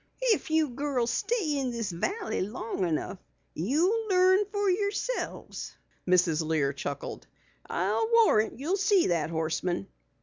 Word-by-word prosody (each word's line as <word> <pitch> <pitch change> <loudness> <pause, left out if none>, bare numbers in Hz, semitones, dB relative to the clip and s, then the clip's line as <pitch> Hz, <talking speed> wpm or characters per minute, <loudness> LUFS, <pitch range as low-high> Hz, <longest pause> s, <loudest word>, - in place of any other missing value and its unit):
"If 395 - -3
you 315 -2 +2
girls 250 -2 -1
stay 400 - 0
in 265 -2 -1
this 230 -5 -3
valley 375 - -2
long 205 -2 -2
enough 170 +4 -2 0.3
you'll 345 - +1
learn 375 +2 +4
fer 410 -1 0
yourselves," 405 +6 -2 0.3
Mrs. 175 -3 +3
Lear 155 -3 0
chuckled. 140 0 -6 0.4
"I'll 450 - 0
warrant 420 - +4
you'll 320 +10 -1
see 395 -2 +3
that 165 -3 0
Horseman." 160 - -1
270 Hz, 130 wpm, -28 LUFS, -, 0.4 s, learn